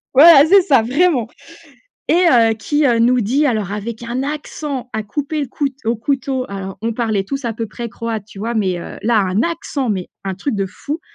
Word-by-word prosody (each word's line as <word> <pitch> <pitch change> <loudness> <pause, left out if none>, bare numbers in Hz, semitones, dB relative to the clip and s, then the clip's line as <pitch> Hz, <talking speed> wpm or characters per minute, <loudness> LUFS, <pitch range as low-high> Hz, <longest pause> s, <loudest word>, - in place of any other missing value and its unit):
Voilà, 290 0 +9
c'est 390 +3 +7
ça, 275 - +4
vraiment, 265 0 +1 0.8
et - - +2 0.2
heu, 230 -2 +5
qui, 290 +6 0
heu, 235 -2 +2
nous 245 +2 +4
dit 255 +8 +1
alors 215 -8 0
avec 225 +3 -5
un 240 +3 -3
accent 290 -2 -5
à 220 - -2
couper 290 +8 -3
le 280 - -3
coute 275 -3 -2
au 230 +1 0
couteau, 265 +2 -1
alors 195 -1 -6
on 230 +1 -1
parlait 220 -4 -1
tous 275 +4 -5
à 235 - -1
peu 225 +1 -4
près 235 +3 -6
croate, 225 -2 -5
tu 205 - -14
vois? 230 +4 -3
Mais 190 -5 0
heu, 170 - -8
là, 225 0 +3
un 195 +3 +1
accent 290 -5 -2
mais 185 -3 -3 0.2
un 190 - -2
truc 245 +4 -2
de 195 - 0
fou, 290 - -6
235 Hz, 215 wpm, -18 LUFS, 215-280 Hz, 0.8 s, Voilà